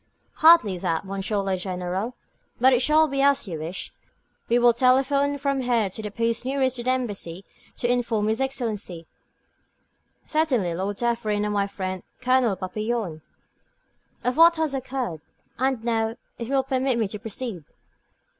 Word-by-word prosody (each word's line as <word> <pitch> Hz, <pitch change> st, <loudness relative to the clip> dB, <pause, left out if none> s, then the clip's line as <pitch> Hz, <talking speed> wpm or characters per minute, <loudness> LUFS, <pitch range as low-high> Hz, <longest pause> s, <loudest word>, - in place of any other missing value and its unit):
"Hardly 310 Hz, -, +6 dB
that, 170 Hz, -1 st, -1 dB
Monsieur 195 Hz, +2 st, -3 dB
le 195 Hz, -1 st, 0 dB
General. 185 Hz, +5 st, -3 dB, 0.4 s
But 260 Hz, +2 st, +6 dB
it 245 Hz, -, +3 dB
shall 310 Hz, +3 st, +4 dB
be 275 Hz, -1 st, -1 dB
as 280 Hz, -4 st, +3 dB
you 165 Hz, -4 st, -5 dB
wish. 165 Hz, +4 st, -5 dB, 0.6 s
We 235 Hz, -, +4 dB
will 240 Hz, 0 st, +5 dB
telephone 270 Hz, +3 st, +2 dB
from 275 Hz, -1 st, -1 dB
here 235 Hz, -6 st, +1 dB
to 220 Hz, -, -5 dB
the 210 Hz, -, -4 dB
post 230 Hz, +2 st, -1 dB
nearest 260 Hz, -1 st, 0 dB
the 240 Hz, +1 st, -2 dB
Embassy 205 Hz, -8 st, -2 dB, 0.3 s
to 240 Hz, -, -1 dB
inform 235 Hz, -3 st, +1 dB
his 220 Hz, +4 st, 0 dB
Excellency 220 Hz, -10 st, -3 dB, 0.6 s
" -, -, -45 dB
"Certainly, 260 Hz, -, +1 dB
Lord 195 Hz, +3 st, -3 dB
Dufferin, 225 Hz, -3 st, 0 dB
and 210 Hz, -, -1 dB
my 200 Hz, -1 st, +1 dB
friend, 185 Hz, -2 st, -4 dB, 0.2 s
Colonel 255 Hz, -4 st, +2 dB
Papillon." 205 Hz, -3 st, -3 dB, 1.0 s
"Of 250 Hz, +2 st, 0 dB
what 335 Hz, +1 st, +7 dB
has 315 Hz, -3 st, -1 dB
occurred. 255 Hz, -, -3 dB, 0.4 s
And 260 Hz, -3 st, 0 dB
now, 225 Hz, -1 st, 0 dB, 0.2 s
if 235 Hz, -, -4 dB
you 275 Hz, -, -1 dB
will 265 Hz, -, +3 dB
permit 260 Hz, -1 st, 0 dB
me 225 Hz, -3 st, +1 dB
to 210 Hz, -, -4 dB
proceed?" 225 Hz, -5 st, -5 dB
235 Hz, 160 wpm, -24 LUFS, 195-260 Hz, 1.0 s, what